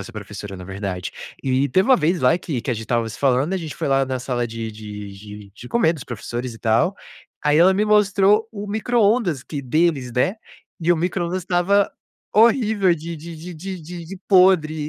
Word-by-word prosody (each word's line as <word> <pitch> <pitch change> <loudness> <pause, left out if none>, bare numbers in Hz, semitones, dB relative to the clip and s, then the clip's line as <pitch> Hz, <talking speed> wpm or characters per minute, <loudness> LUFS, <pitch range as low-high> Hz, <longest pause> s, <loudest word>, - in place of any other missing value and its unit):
essa 120 +4 -9
professora, 105 -2 -8
na 90 - -9
verdade. 95 -1 -5 0.3
E 135 +1 +1
teve 185 - +2
uma 260 - +7
vez 170 0 +1
lá 125 +6 +4
que 150 -8 -4
que 125 - -4
a - - +1
gente 115 - -5
estava 115 0 -1
se 110 - -8
falando, 140 +7 +2
gente 160 -5 -6
foi - - -3
lá 135 0 +3
na 130 -1 -3
sala 125 -1 -2
de 115 -1 -5
de 105 -2 -8
de 105 0 -11
de 120 +3 -11
comer 170 - +3
dos 155 - -8
professores 120 +1 -5
e 115 - -12
tal, 115 - +1 0.5
aí 150 +1 +4
ela 185 +3 +6
me 205 +2 +1
mostrou 210 0 +3
o 210 -2 -7
microondas 210 - +1
que 145 -3 -5
deles, 140 -2 +1
né, 125 - +1 0.5
e 170 +1 +1
o - - +1
microondas 175 +1 -2
estava 190 +3 +2 0.4
horrível, 215 -5 +4
de 165 +1 -7
de 165 +2 -9
de 170 +3 -9
de 175 0 -7
de 185 +3 -9
podre 180 -5 +5
155 Hz, 200 wpm, -21 LUFS, 120-190 Hz, 0.5 s, uma